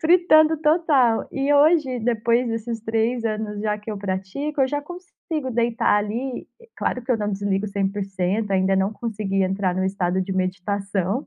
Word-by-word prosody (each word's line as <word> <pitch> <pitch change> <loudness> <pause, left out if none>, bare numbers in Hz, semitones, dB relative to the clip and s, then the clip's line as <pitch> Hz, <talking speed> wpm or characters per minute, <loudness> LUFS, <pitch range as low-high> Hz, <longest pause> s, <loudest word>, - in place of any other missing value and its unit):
Fritando 320 -2 +5
total. 300 -7 +3
E 275 +1 0
hoje 290 -3 +4
depois 235 +1 +1
desses 225 0 -3
3 225 +2 0
anos 215 -1 -3
já 210 -1 -1
que 210 +1 -8
eu 210 - -4
pratico, 200 +10 -3
eu 260 - +2
já 290 +2 -1
consigo 320 -3 -6
deitar 235 0 +1
ali, 235 +5 -3
e 470 - -18
claro 250 - -2
que 250 - -6
eu 235 - +2
não 210 -1 -2
desligo 200 0 -1
100%. 195 0 -2
Ainda 190 0 +2
não 190 +2 +1
consegui 210 -4 -2
entrar 190 -1 0
no 185 - -1
estado 190 -1 0
de 190 - -4
meditação. 195 - -2
220 Hz, 170 wpm, -23 LUFS, 195-260 Hz, -, Fritando